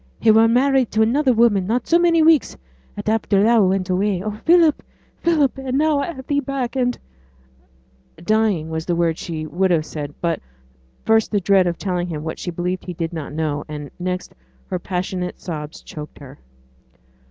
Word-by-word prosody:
He 220 - +5
were 225 +1 +6
married 260 +1 +3
to 220 +1 +4
another 260 +4 +2
woman 220 -5 +3
not 235 +3 0
so 340 - +3
many 335 -2 +4
weeks 315 -2 +3 0.4
at - - -6
after 215 -2 +2
thou 225 -3 +4
went 185 -1 0
away. 185 0 0
Oh, 215 - -2
Philip, 325 +8 +3 0.4
Philip! 300 -5 +1
and 265 0 -2
now 305 -1 +2
I 310 - -2
have 265 -5 -10
thee 285 +1 0
back, 275 -2 -3
and 245 -1 0 0.6
' 65 0 -35
'Dying' 205 -5 +1
was 160 0 -4
the 175 - +1
word 170 -1 0
she 160 -2 -5
would 185 +4 0
have 165 -3 +1
said, 145 -2 -6
but 170 -2 -1 0.7
first 220 0 +3
the 205 - +1
dread 190 -1 +3
of 170 - -2
telling 180 -2 -2
him 155 -3 -5
what 160 - -5
she - - -4
believed 180 +1 -3
he 180 - -5
did 165 0 -4
not 155 -4 -5
know, 150 -1 -2
and 150 -2 -7
next 180 0 -4 0.4
her 180 - -1
passionate 180 0 -4
sobs, 155 -3 -7
choked 150 -1 -9
her. 140 -1 -13
190 Hz, 190 wpm, -21 LUFS, 165-245 Hz, 0.7 s, were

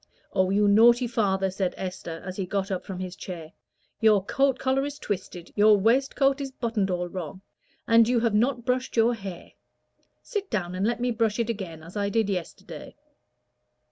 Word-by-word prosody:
"Oh, 185 0 +2
you 205 +2 +3
naughty 235 +4 +6
father!" 195 -5 0
said 190 -1 -2
Esther, 180 -3 -6
as 185 -1 -5
he 190 -2 -3
got 195 +1 -2
up 185 - -2
from 190 - -7
his 185 0 -5
chair, 165 -4 -8 0.5
"your 215 -4 +4
coat 270 +2 +2
collar 265 +1 +1
is 285 0 -5
twisted, 185 - -5
your 210 0 +6
waistcoat 270 +6 +2
is 270 -1 -4
buttoned 230 -6 -1
all 180 -1 -1
wrong, 185 +1 -7 0.4
and 230 -1 +6
you 245 -2 +2
have 230 -2 +1
not 240 +2 +1
brushed 255 -1 -1
your 230 +2 +4
hair. 195 -6 -8 0.7
Sit 410 -4 -4
down 180 -5 -2
and 190 +3 0
let 235 0 -1
me 245 0 +1
brush 225 -2 0
it 235 -1 0
again 175 -7 -7
as 165 +4 -12
I 200 -1 0
did 210 -1 +1
yesterday." 180 -3 -6
210 Hz, 185 wpm, -26 LUFS, 185-240 Hz, 0.7 s, naughty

